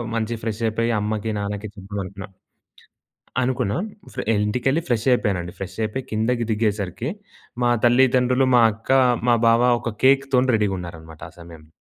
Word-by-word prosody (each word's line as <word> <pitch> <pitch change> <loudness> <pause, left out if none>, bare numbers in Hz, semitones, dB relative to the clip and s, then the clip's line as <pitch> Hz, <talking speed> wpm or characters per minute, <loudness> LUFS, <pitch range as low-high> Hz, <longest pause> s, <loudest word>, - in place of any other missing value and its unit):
మంచిగా 115 0 -2
ఫ్రెష్‌అప్ 110 0 -2
అయి, 115 - +1
అమ్మకి, 105 +1 -2
నాన్నకి 100 +1 -4
చెప్దాం 100 0 -7
అనుకున్నా. 95 +1 -8 1.1
అనుకున్నాం 125 - -1 0.3
ఫ్రె - - -4 0.2
ఇంటికెళ్ళి, 125 +8 0
ఫ్రెషయిపోయానండి. 110 -7 0
ఫ్రెషయిపోయి 105 +6 -4
కిందకి 115 +3 0
దిగేసరికి, 105 - -1 0.5
మా 120 - +3
తల్లిదండ్రులు, 125 +1 +3
మా 120 - +6
అక్క, 110 +4 -6 0.4
మా 120 - +5
బావ 115 +1 +4 0.2
ఒక 115 -3 -4
కేక్‌తోని 135 -1 +3
రెడీగా 105 -3 0
ఉన్నారనమాట 80 -2 -10
ఆ - - -26
సమయంలో. 80 -2 -13
110 Hz, 130 wpm, -22 LUFS, 100-125 Hz, 1.1 s, మా